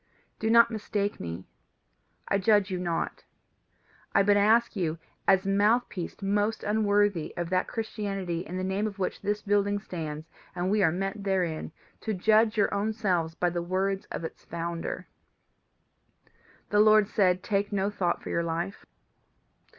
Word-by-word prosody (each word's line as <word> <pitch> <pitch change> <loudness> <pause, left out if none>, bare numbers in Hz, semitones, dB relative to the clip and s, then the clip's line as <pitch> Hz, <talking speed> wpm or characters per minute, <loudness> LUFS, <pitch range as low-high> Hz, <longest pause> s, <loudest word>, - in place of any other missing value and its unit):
Do 220 - 0
not 235 +1 +6
mistake 205 -2 -2
me: 85 +2 -6 0.8
I 200 - +1
judge 205 -1 +3
you 185 - -2
not. 170 -2 -2 0.9
I 200 - +6
but 205 +1 +4
ask 225 +4 +4
you, 170 -4 -1 0.3
as 190 0 +4
mouthpiece 205 -1 +1
most 205 +2 0
unworthy 205 -4 +1
of 175 0 -3
that 185 0 +1
Christianity 195 -6 -3
in 185 -1 -6
the 185 - -2
name 190 +3 0
of 205 -2 -7
which 190 - -3
this 210 +1 -2
building 205 0 +2
stands 160 -6 -6 0.3
and 180 +1 -1
we 210 0 +3
are 165 -4 +4
met 195 +4 -3
therein, 180 -6 -1 0.3
to 220 -2 -3
judge 220 +3 +3
your 205 - +2
own 210 +2 0
selves 180 -7 0
by 175 0 0
the 175 0 -2
words 190 +3 -1
of - - -5
its 160 - -7
founder. 170 0 -4 1.6
"The 205 - +4
Lord 215 -1 +6
said: 185 -4 +2
Take 200 0 0
no 200 0 0
thought 180 -4 -1
for - - -5
your 170 - 0
life. 170 +4 -4
195 Hz, 160 wpm, -28 LUFS, 175-210 Hz, 1.6 s, not